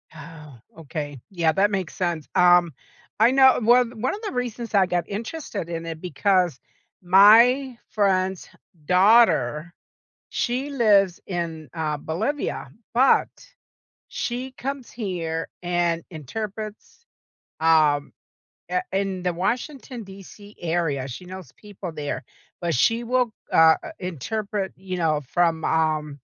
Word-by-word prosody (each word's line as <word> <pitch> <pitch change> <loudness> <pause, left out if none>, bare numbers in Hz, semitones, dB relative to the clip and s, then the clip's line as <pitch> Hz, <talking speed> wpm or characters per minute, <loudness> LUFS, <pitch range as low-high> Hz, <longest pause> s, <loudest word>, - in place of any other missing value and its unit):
Oh, 150 -3 -12 0.2
okay. 145 -2 -6
Yeah, 170 -4 +1
that 205 +2 +2
makes 190 -4 -3
sense. 170 -4 -2
Um, 175 -3 +5 0.5
I 230 +3 +6
know 265 -1 +6
one 240 0 +3
one 260 - 0
of 425 - -10
the 415 - -4
reasons 240 -2 -4
I 195 -2 +5
got 175 -2 -2
interested 210 - -5
in 165 -1 -4
it 165 -1 -6
because 180 -2 +1 0.4
my 230 +8 +6
friend's 190 -3 0 0.4
daughter, 175 - +4 0.6
she 255 +3 -2
lives 205 -9 +3
in, 165 -4 -4
uh, 155 -2 -2
Bolivia, 215 - -3 0.2
but, 260 +3 +4 0.8
she 250 +2 -4
comes 270 -1 -6
here 170 -7 -4
and 175 -1 0
interprets, 210 - -7 0.6
um, 155 -3 +3 0.6
eh, 365 - 0
in 195 -1 -1
the 180 - +1
Washington 240 - -3
DC 200 +2 -13
area, 160 -6 -1
she 160 +9 -8
knows 185 -1 -10
people 200 -4 -8
there. 145 -2 -4 0.4
But 170 -3 -1
she 230 - +2
will, 250 -1 +1 0.2
uh, 160 0 +7
i 325 -2 -8
interpret, 195 - -4
you 185 -1 -6
know, 155 -3 +1
from, 165 -2 +1
um 155 -3 0
185 Hz, 125 wpm, -24 LUFS, 165-225 Hz, 0.8 s, uh